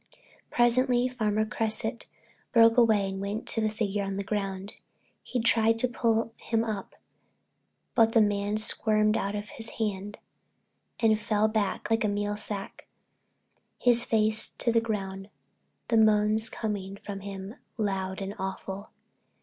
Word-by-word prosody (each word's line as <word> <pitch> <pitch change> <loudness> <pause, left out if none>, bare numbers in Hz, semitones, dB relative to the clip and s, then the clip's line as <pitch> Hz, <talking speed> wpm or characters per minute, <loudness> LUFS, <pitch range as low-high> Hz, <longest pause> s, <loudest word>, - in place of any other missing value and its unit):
Presently 245 +1 +3
Farmer 215 -4 0
Cresset 220 +2 0 0.4
broke 230 -2 +6
away 220 -5 +4
and 195 0 -5
went 205 +2 -4
to 225 - 0
the 215 - +1
figure 210 -2 -2
on 195 0 -3
the 200 - -2
ground. 195 -1 -3 0.5
He 250 - -3
tried 225 0 +3
to 250 - +2
pull 230 -1 0
him 225 -1 -1
up, 215 -4 -5 1.0
but 225 -1 +4
the 230 - +5
man 205 0 +1
squirmed 215 0 +1
out 200 -1 -1
of 205 0 -5
his 225 0 -5
hand 205 -2 -3 0.8
and 220 -2 +3
fell 215 0 +1
back 215 0 -2
like 225 0 +2
a - - +2
meal 205 0 -1
sack, 205 -1 -4 0.9
his 240 -1 +5
face 220 -2 +2
to 235 - +1
the 230 0 +2
earth, 195 -2 -4 0.6
the 230 - +3
moans 215 0 +3
coming 200 -3 -4
from 200 0 -7
him 195 +2 -8 0.2
loud 195 -3 -2
and 195 +1 -5
awful. 190 +1 -5
215 Hz, 145 wpm, -28 LUFS, 200-225 Hz, 1.0 s, broke